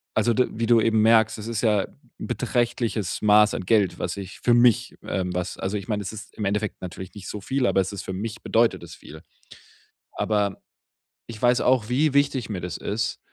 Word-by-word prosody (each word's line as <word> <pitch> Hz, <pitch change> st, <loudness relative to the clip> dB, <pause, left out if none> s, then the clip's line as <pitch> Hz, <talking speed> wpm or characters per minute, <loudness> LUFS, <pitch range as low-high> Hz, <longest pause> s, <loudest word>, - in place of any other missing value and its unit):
also 120 Hz, -, +2 dB
d 125 Hz, +2 st, +2 dB
wie 115 Hz, +1 st, -2 dB
du 115 Hz, -2 st, +5 dB
eben 110 Hz, -1 st, +2 dB
merkst, 110 Hz, 0 st, +4 dB
das 110 Hz, -, -7 dB
ist 115 Hz, -2 st, -2 dB
ja 105 Hz, -4 st, +2 dB, 0.3 s
beträchtliches 120 Hz, -5 st, -1 dB
Maß 105 Hz, 0 st, +5 dB
an -, -, -4 dB
Geld, 95 Hz, -4 st, +2 dB
was 90 Hz, +3 st, -3 dB
ich 95 Hz, -1 st, -8 dB
für 120 Hz, -, +3 dB
mich, 120 Hz, +1 st, +3 dB
ähm 90 Hz, -2 st, -2 dB
was 90 Hz, 0 st, -3 dB
also, 95 Hz, +2 st, -2 dB
ich 100 Hz, -, -7 dB
meine, 105 Hz, -1 st, -1 dB
das 95 Hz, -, -5 dB
ist 105 Hz, -, -10 dB
im 105 Hz, -, -5 dB
Endeffekt 105 Hz, +1 st, -2 dB
natürlich 90 Hz, +1 st, -8 dB
nicht 100 Hz, -, -8 dB
so 105 Hz, -, -5 dB
viel, 130 Hz, +5 st, -1 dB
aber -, -, +2 dB
es 95 Hz, +2 st, -4 dB
ist 95 Hz, -, -6 dB
für -, -, -6 dB
mich 110 Hz, +4 st, -5 dB
bedeutet 115 Hz, +1 st, +2 dB
es -, -, -10 dB
viel. 80 Hz, +1 st, -13 dB, 0.9 s
Aber 105 Hz, -2 st, -1 dB, 0.7 s
ich 115 Hz, -2 st, -9 dB
weiß 125 Hz, 0 st, +3 dB
auch, 125 Hz, -4 st, +2 dB
wie 140 Hz, +4 st, +2 dB
wichtig 140 Hz, -5 st, +1 dB
mir 95 Hz, -4 st, -4 dB
das 90 Hz, -, -5 dB
ist. 105 Hz, +1 st, -3 dB
105 Hz, 210 wpm, -24 LUFS, 95-120 Hz, 0.9 s, du